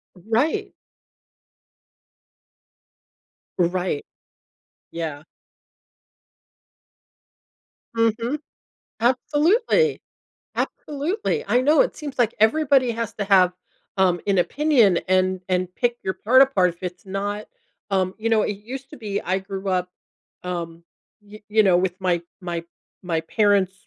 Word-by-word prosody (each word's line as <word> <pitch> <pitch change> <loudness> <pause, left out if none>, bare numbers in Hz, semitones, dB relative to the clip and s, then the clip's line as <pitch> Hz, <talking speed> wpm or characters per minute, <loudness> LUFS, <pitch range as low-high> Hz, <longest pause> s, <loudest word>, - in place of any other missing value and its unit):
Right. 260 - 0 2.9
Right. 180 -3 0 0.9
Yeah. 155 -3 -5 2.7
Mhm. 230 +5 +1 0.6
Absolutely. 320 - +2 0.5
Absolutely. 365 - -2
I 245 - +3
know, 300 - +5
it - - 0
seems 290 -3 -7
like 235 -2 +2
everybody 265 +2 +4
has 230 -1 -4
to 205 - -2
have, 185 -3 +5 0.4
um, 180 -2 +3
an 195 -2 +2
opinion 235 - +3
and 185 0 +2
and 185 -1 -1
pick 240 0 0
your 190 - -1
part 255 +7 +4
apart 200 -10 +4
if 175 - -21
it's 180 +1 -6
not, 205 +2 -4 0.4
um, 190 -2 +1
you 225 +1 -1
know 220 -1 +4
it 205 - -2
used 260 +6 -8
to 300 - -10
be 205 -3 -3
I 185 +1 -1
grew 195 0 -5
up, 180 -1 0 0.5
um, 170 -2 -5 0.4
y 210 +1 -14
you 215 +1 +4
know, 185 -3 +5
with 185 0 -1
my 175 -2 +1 0.2
my 170 -2 -4 0.4
my 165 -3 -1
parents, 200 +1 +2
205 Hz, 115 wpm, -23 LUFS, 185-255 Hz, 2.9 s, know